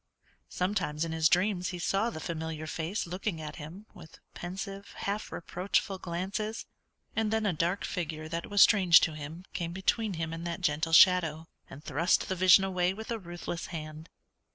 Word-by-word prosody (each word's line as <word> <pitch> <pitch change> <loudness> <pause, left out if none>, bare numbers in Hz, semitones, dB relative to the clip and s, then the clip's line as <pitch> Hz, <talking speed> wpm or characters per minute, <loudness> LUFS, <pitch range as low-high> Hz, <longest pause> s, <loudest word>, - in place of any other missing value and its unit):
Sometimes 180 -5 -1
in 165 - -5
his 160 -1 +3
dreams 180 0 +2
he 180 - -5
saw 195 +5 0
the 160 - -7
familiar 160 -1 -4
face 165 +6 -3
looking 180 0 -3
at 150 -1 -7
him 165 +7 -9
with 160 -2 -14 0.2
pensive, 195 +2 -7
half 205 +2 -3
reproachful 190 +3 -1
glances; 195 +6 -3 0.5
and 220 -1 +1
then 220 -1 +1
a 200 - +2
dark 170 +5 -1
figure 155 -4 -4
that 165 +1 -4
was 205 -1 +7
strange 185 -6 +7
to 160 - +1
him 155 +4 -8
came 170 -2 -3
between 195 +2 0
him 165 0 -3
and 165 +1 -5
that 170 +1 -4
gentle 155 0 0
shadow, 165 -3 +6 0.2
and 140 +3 -11
thrust 160 +5 +1
the 190 - 0
vision 185 +1 +6
away 185 -1 0
with 220 +2 -7
a 230 - -2
ruthless 175 -1 -6
hand. 155 -1 -7
175 Hz, 175 wpm, -30 LUFS, 160-195 Hz, 0.5 s, was